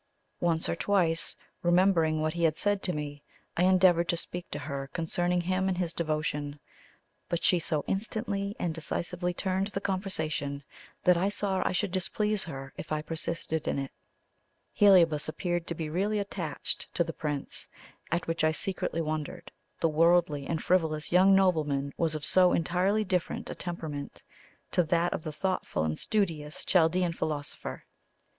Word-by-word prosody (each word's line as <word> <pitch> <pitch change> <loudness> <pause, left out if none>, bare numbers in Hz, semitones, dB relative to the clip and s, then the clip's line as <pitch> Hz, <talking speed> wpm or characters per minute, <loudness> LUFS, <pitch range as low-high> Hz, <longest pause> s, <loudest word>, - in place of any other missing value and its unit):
Once 165 -2 +1
or - - 0
twice, 170 -3 +2 0.3
remembering 175 -3 +3
what 155 0 0
he 170 - -3
had 160 -1 +3
said 205 -1 +1
to 180 - 0
me, 145 -2 -5 0.3
I 180 - +3
endeavoured 185 -2 +5
to 170 - +2
speak 175 +1 -4
to - - -4
her 140 -1 -4
concerning 175 +2 0
him 185 +2 0
and 185 -2 0
his 175 -2 -1
devotion; 150 -2 -2 0.7
but 170 - -1
she 180 - +4
so 155 -2 -1
instantly 200 -1 -2
and 170 -2 -1
decisively 175 +2 -2
turned 190 +2 -1
the 200 -2 -3
conversation 160 -8 -2 0.4
that 180 -1 +5
I 190 +3 +2
saw 195 -2 -1
I - - 0
should 185 +1 0
displease 210 +3 0
her 135 -4 -7
if 155 - -8
I 150 0 -1
persisted 160 -1 -2
in - - 0
it. 135 -1 -3 0.8
Heliobas 170 -7 +5
appeared 175 +1 -2
to 170 - -3
be 160 -1 -3
really 195 +7 0
attached 190 -7 -3
to 170 - +3
the 165 -1 -5
Prince, 145 -2 -3 0.4
at 170 +1 0
which 165 -1 -1
I 155 0 +4
secretly 170 -1 -2
wondered; 155 -2 -4 0.3
the - - +4
worldly 160 -2 +3
and 165 -2 -2
frivolous 160 -4 +1
young 190 +2 +6
nobleman 150 -7 +2
was 160 -2 0
of 150 -1 -3
so 180 -1 +5
entirely 185 +6 +2
different 185 -4 -2
a - - -3
temperament 160 -5 -6 0.5
to - - +3
that 170 +1 +1
of - - -3
the 155 - -4
thoughtful 185 - -1
and 80 0 -1
studious 165 -8 -1
Chaldean 175 0 +3
philosopher. 150 -3 -4
170 Hz, 165 wpm, -29 LUFS, 155-185 Hz, 0.8 s, young